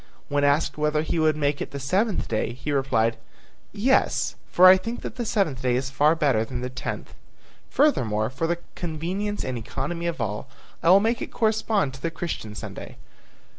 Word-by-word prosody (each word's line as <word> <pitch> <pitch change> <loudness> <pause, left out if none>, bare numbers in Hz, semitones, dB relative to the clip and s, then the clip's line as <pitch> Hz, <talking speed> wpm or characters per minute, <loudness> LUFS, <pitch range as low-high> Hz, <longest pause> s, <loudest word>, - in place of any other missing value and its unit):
When 145 0 +1
asked 145 +2 +2
whether 150 0 +1
he 165 +1 -1
would 155 -1 +3
make 145 -1 0
it - - -3
the 140 - -6
seventh 190 - 0
day, 110 +1 -1
he 130 +4 -5
replied, 115 -5 +1 0.5
"Yes, 240 +6 +2 0.2
for 180 - +5
I 185 0 +10
think 225 +6 -4
that - - -6
the 240 -3 -3
seventh 160 - 0
day 125 -2 +1
is 130 +1 -2
far 150 +4 +3
better 140 -9 +2
than 125 +2 -5
the 125 0 -4
tenth. 125 -1 -5 0.6
Furthermore, 110 - +2
for 165 +5 -2
the 170 +1 0 0.2
convenience 180 +5 -3
and 125 -2 -3
economy 170 +9 -4
of 170 -3 -3
all, 110 +3 -3 0.3
I 165 - +3
will 190 +2 +7
make 230 +2 0
it - - -5
correspond 215 - +1
to 135 - -11
the 165 - -1
Christian 160 -11 -5
Sunday. - - -8
150 Hz, 190 wpm, -25 LUFS, 130-185 Hz, 0.6 s, I